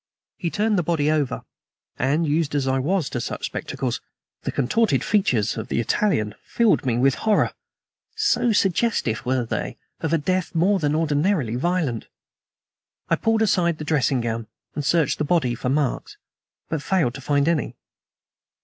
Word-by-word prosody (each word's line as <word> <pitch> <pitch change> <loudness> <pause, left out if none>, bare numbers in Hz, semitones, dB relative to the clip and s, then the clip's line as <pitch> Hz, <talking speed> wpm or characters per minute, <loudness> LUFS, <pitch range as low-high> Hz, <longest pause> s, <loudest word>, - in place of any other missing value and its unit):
He 170 - -2
turned 210 +1 +1
the - - +3
body 155 -3 +1
over, 150 -4 0 0.6
and, 145 +6 +2
used 150 0 0
as 140 -2 0
I 130 0 +2
was 165 +3 0
to 120 - -2
such - - -4
spectacles, - - -3 0.4
the - - -3
contorted 225 - +1
features 125 - +1
of 110 - -4
the - - -1
Italian 110 - +1
filled 225 - +2
me 120 -2 +1
with 135 +2 +4
horror, 215 -2 +3 0.6
so 245 - +2
suggestive 195 - +1
were 130 -1 +1
they - - -3 0.2
of 160 - -2
a 165 - +4
death 185 +3 -1
more 190 +4 +3
than 150 -2 +1
ordinarily 150 - +1
violent. 150 -5 -1 1.0
I - - +4
pulled 225 0 +1
aside 170 -5 +2
the 155 - -6
dressing 135 -4 +1
gown 115 -1 -3 0.3
and 150 - -3
searched 155 0 +2
the - - +1
body 150 -6 +1
for 125 +1 -3
marks, 140 -1 -1 0.5
but 160 -3 -2
failed 165 -8 +1
to 135 - -8
find 145 +2 +1
any. 155 -7 0
150 Hz, 165 wpm, -23 LUFS, 130-185 Hz, 1.0 s, with